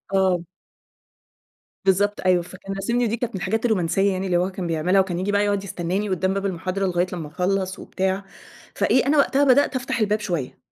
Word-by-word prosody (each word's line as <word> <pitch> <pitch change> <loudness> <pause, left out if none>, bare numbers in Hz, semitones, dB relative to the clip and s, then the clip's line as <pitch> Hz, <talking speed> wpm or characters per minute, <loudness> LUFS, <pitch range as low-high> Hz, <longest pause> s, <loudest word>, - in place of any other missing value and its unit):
آه. 185 -3 +2 1.4
بالضبط 205 +2 +2
أيوه، 180 -1 +4
فكان 185 +3 -8
راسمني 235 +5 0
دي 230 +2 -1
كانت 235 -3 -3
من - - -1
الحاجات 220 +4 -1
الرومانسية 195 -2 +2
يعني 190 0 -2
اللي 180 -2 +2
هو 180 +2 +1
كان 185 -2 -4
بيعملها، 170 +4 +2
وكان 180 -2 -3
ييجي 200 +2 -1
بقى 205 0 +2
يقعد 200 -1 0
يستناني 190 +2 -2
قدّام 190 +1 0
باب 195 0 -2
المحاضرة 190 +1 -2
لغاية 180 0 +1
لمّا 165 -4 -5
اخلّص 190 +4 -1
وبتاع، 190 +1 -2 0.5
فإيه 260 - +2
أنا 295 +2 +3
وقتها 280 0 +3
بدأت 280 +1 +4
أفتح 255 -1 -2
الباب 210 0 +1
شوية، 170 -11 -3
195 Hz, 190 wpm, -23 LUFS, 180-205 Hz, 1.4 s, أيوه